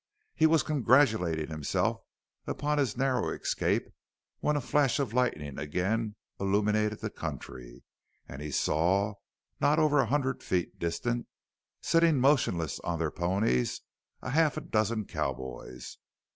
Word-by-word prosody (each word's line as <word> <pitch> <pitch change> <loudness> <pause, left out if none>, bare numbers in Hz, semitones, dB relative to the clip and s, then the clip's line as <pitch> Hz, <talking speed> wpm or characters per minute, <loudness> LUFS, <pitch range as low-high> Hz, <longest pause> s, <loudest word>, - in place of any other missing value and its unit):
He 160 - +4
was 160 0 +3
congratulating 110 - +2
himself 75 -2 -1 0.5
upon 150 0 -1
his 125 -5 0
narrow 130 -2 +1
escape - - -1 0.5
when 150 - +1
a - - +2
flash 140 0 +2
of 135 -6 -2
lightning 75 - -1
again 100 +9 -1 0.2
illuminated 105 +2 +1
the - - -3
country - - -7 0.4
and 65 +3 -8
he 75 - -5
saw, 90 +9 +1 0.5
not 150 +2 +3
over 150 -2 +4
a - - +3
hundred 135 -2 0
feet 90 -2 -2
distant, 115 +9 -2 0.5
sitting 165 -2 +3
motionless 125 - +2
on 85 -1 -3
their 80 -2 -1
ponies, 85 - 0 0.4
a 130 - -3
half 155 0 +3
dozen 110 0 +1
cowboys. 65 -5 -5
110 Hz, 130 wpm, -29 LUFS, 80-135 Hz, 0.5 s, He